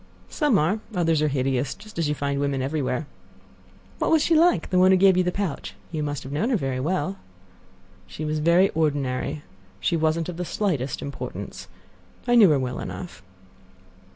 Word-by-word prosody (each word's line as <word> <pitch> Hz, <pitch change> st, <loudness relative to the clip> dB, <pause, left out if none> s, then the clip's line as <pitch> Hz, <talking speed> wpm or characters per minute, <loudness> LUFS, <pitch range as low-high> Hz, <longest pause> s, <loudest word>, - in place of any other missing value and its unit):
"Some 295 Hz, -9 st, +2 dB
are; 185 Hz, +7 st, +1 dB, 0.2 s
others 165 Hz, -3 st, +2 dB
are 155 Hz, -, +3 dB
hideous, 135 Hz, -1 st, -1 dB
just 215 Hz, -3 st, -10 dB
as 160 Hz, -3 st, +1 dB
you 150 Hz, -, 0 dB
find 140 Hz, -1 st, -2 dB
women 140 Hz, -2 st, -1 dB
everywhere." 140 Hz, 0 st, -2 dB, 0.9 s
"What -, -, +1 dB
was 320 Hz, -2 st, +4 dB
she 335 Hz, -, +2 dB
like—the 320 Hz, -, +3 dB
one 185 Hz, +1 st, +6 dB
who 190 Hz, -, +6 dB
gave 190 Hz, 0 st, +5 dB
you 185 Hz, -, +3 dB
the 180 Hz, -, 0 dB
pouch? 190 Hz, -7 st, -4 dB, 0.2 s
You 155 Hz, -2 st, -3 dB
must 145 Hz, -2 st, -3 dB
have 130 Hz, -, -8 dB
known 155 Hz, -, 0 dB
her 255 Hz, -, +2 dB
very 135 Hz, -6 st, -2 dB
well." 185 Hz, +6 st, -1 dB, 0.9 s
"She 155 Hz, -, -6 dB
was 155 Hz, 0 st, -1 dB
very 170 Hz, +5 st, +4 dB
ordinary. 145 Hz, -2 st, -1 dB, 0.4 s
She 170 Hz, -, 0 dB
wasn't 160 Hz, 0 st, +1 dB
of 180 Hz, -2 st, -6 dB
the 180 Hz, -, -2 dB
slightest 160 Hz, -, -2 dB
importance. 140 Hz, -, -7 dB, 0.6 s
I 240 Hz, -, +3 dB
knew 220 Hz, -6 st, +7 dB
her 150 Hz, -, +4 dB
well 130 Hz, -1 st, -3 dB
enough." 175 Hz, -, -7 dB
160 Hz, 180 wpm, -24 LUFS, 140-185 Hz, 0.9 s, knew